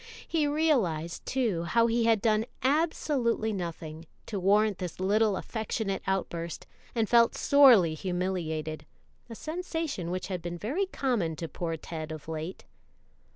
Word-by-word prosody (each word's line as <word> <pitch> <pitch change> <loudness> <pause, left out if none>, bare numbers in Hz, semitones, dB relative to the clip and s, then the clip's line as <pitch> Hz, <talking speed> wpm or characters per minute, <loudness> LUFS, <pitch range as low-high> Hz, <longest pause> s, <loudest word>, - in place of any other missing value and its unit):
He 310 -3 +1
realized, 235 - 0
too, 230 -10 0
how 230 +6 +3
he 230 0 +2
had 225 -3 +3
done 220 0 +2 0.2
absolutely 265 -6 +1
nothing; 165 -3 -6 0.2
to 205 - -4
warrant 205 +2 +3
this 180 -2 -5
little 205 +1 +2
affectionate 220 -3 -3
outburst, 170 -4 -2 0.3
and 225 -2 +1
felt 235 0 +5
sorely 245 - +6
humiliated 165 -3 -3 0.4
a 230 - -7
sensation 320 - -4
which 185 +1 -3
had 185 -3 -4
been 175 +1 -5
very 290 - -1
common 235 - -1
to 165 +2 -5
poor 165 0 -4
Ted 160 0 -6
of 155 -1 -8
late. 160 +3 -5
200 Hz, 140 wpm, -29 LUFS, 170-235 Hz, 0.4 s, sorely